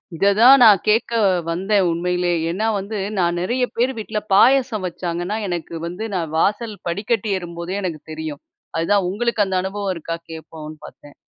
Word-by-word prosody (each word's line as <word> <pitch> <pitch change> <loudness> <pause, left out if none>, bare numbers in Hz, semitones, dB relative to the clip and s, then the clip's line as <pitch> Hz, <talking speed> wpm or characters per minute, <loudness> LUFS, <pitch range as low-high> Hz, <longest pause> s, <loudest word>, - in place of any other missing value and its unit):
இத 200 +5 +3
தான் 260 +4 +8
நான் 210 -4 +8
கேக்க 220 +3 +2 0.4
வந்தேன் 190 +3 +1
உண்மையிலே. 180 +1 0 0.2
ஏன்னா 190 +6 -2
வந்து 205 +3 -5 0.2
நான் 175 -1 +1
நெறைய 245 +7 0
பேர் 250 +3 +1
வீட்ல 215 0 -3
பாயாசம் 245 -1 +4
வச்சாங்கன்னா, 175 +2 -4
எனக்கு 175 -2 -4
வந்து 180 +5 -6
நான் 165 -4 -3
வாசல் 210 +5 0
படிக்கட்டு 205 +5 -1
ஏறும்போதே 175 +2 -5
எனக்கு 165 -5 -4
தெரியும். 155 -2 -6 0.4
அதுதான் 190 +4 +2
உங்களுக்கு 225 +1 0
அந்த 190 -1 -3
அனுபவம் 195 0 -3
இருக்கா? 165 0 -5
கேப்போம்ன்னு 160 -1 -9
பார்த்தேன்! 145 -1 -14
190 Hz, 155 wpm, -20 LUFS, 170-215 Hz, 0.4 s, தான்